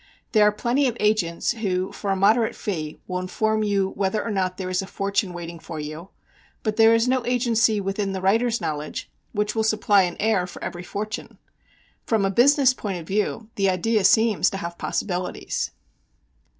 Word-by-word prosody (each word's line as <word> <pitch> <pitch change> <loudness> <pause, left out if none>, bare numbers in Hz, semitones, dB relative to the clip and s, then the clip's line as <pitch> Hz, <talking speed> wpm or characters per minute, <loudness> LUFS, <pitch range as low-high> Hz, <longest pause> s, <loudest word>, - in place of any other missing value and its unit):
There 210 -2 +5
are - - +4
plenty 245 +6 +1
of 235 -2 -2
"agents" 210 -6 +1
who 190 -4 -2
for 200 - -5
a 195 - +2
moderate 220 +4 +3
fee 155 -7 -4
will 180 -1 -3
inform 215 +4 0
you 200 -2 +1
whether 195 +2 -1
or 230 - -2
not 185 -2 -1
there 185 -1 -4
is 185 - +1
a 195 - -7
fortune 200 -1 -1
waiting 170 -1 -7
for 160 -1 -7
you, 155 +5 -7 0.5
but 215 -2 -1
there 225 0 +6
is 230 +2 +2
no 255 -1 +1
agency 235 -3 +2
within 195 0 -2
the 190 - -3
writer's 225 +5 +2
knowledge 150 0 -4 0.2
which 210 -1 -1
will 225 - 0
supply 215 -2 +3
an 175 -2 -1
heir 200 -4 +1
for - - -10
every 175 - -5
fortune. 215 +5 -6 0.7
From 220 -4 +2
a 195 - +1
business 265 +4 +5
point 200 -6 -4
of 165 - -9
view 210 +3 -2
the 195 -1 +3
idea 205 +3 +1
seems 220 +2 +4
to 195 - -5
have 170 -3 -5
possibilities. 180 -2 -2
205 Hz, 190 wpm, -24 LUFS, 185-220 Hz, 0.7 s, there